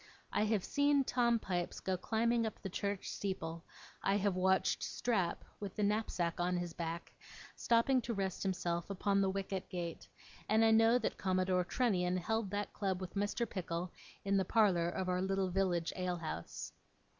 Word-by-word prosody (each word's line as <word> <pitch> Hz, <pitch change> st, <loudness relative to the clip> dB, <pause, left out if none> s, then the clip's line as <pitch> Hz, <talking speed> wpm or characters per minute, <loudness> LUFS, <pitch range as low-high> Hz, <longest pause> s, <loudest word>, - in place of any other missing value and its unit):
I 210 Hz, -, +2 dB
have 210 Hz, -3 st, +1 dB
seen 285 Hz, -1 st, +3 dB
Tom 240 Hz, -2 st, +2 dB
Pipes 180 Hz, -5 st, -3 dB
go 190 Hz, -, -1 dB
climbing 230 Hz, +5 st, +1 dB
up 220 Hz, -, -7 dB
the 195 Hz, -, -3 dB
church 200 Hz, 0 st, -2 dB
steeple; 170 Hz, -4 st, -4 dB, 0.4 s
I 195 Hz, +1 st, +2 dB
have 200 Hz, -2 st, +1 dB
watched 190 Hz, 0 st, +2 dB
Strap, 205 Hz, -8 st, -1 dB
with 200 Hz, -2 st, -6 dB
the 210 Hz, -, 0 dB
knapsack 200 Hz, -5 st, 0 dB
on 180 Hz, +1 st, +1 dB
his 175 Hz, -1 st, -3 dB
back, 165 Hz, 0 st, -5 dB, 0.4 s
stopping 240 Hz, +3 st, +3 dB
to 235 Hz, -, -3 dB
rest 190 Hz, -2 st, -2 dB
himself 175 Hz, -2 st, -1 dB
upon 200 Hz, 0 st, +1 dB
the 195 Hz, -, +2 dB
wicket 195 Hz, -1 st, -3 dB
gate; 170 Hz, -2 st, -5 dB, 0.4 s
and 220 Hz, +1 st, +5 dB
I 225 Hz, -, +5 dB
know 225 Hz, +2 st, +6 dB
that 235 Hz, -, -2 dB
Commodore 185 Hz, -1 st, +1 dB
Trunnion 185 Hz, -5 st, +1 dB
held 220 Hz, +3 st, -1 dB
that 205 Hz, +1 st, -3 dB
club 190 Hz, -3 st, -1 dB
with 185 Hz, -1 st, -6 dB
Mr. 205 Hz, +4 st, 0 dB
Pickle, 175 Hz, -2 st, -3 dB, 0.3 s
in 200 Hz, 0 st, +3 dB
the 190 Hz, -, +3 dB
parlour 185 Hz, -5 st, +3 dB
of 185 Hz, +1 st, -3 dB
our 180 Hz, 0 st, +1 dB
little 190 Hz, -1 st, 0 dB
village 175 Hz, -3 st, +1 dB
alehouse. 175 Hz, -, -4 dB
190 Hz, 170 wpm, -35 LUFS, 180-215 Hz, 0.4 s, know